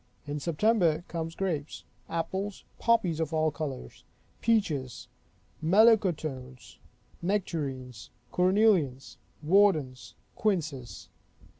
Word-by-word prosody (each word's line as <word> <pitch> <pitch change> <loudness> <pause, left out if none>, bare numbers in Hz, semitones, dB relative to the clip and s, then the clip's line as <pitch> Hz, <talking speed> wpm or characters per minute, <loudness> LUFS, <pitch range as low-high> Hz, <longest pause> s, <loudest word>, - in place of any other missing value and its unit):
In 145 +1 -4
September 170 0 +2
come 165 -1 -4
grapes; 160 -6 -3 0.3
apples; 190 +4 -3 0.2
poppies 210 -9 +2
of 160 -1 -2
all 155 0 +2
colors; 140 - -6 0.4
peaches; 155 - 0 0.6
melocotones; 160 - +2 0.4
nectarines; 140 - -3 0.2
cornelians; 180 - +2 0.3
wardens; 155 -8 +2 0.2
quinces. 155 - -2
160 Hz, 80 wpm, -28 LUFS, 140-195 Hz, 0.6 s, September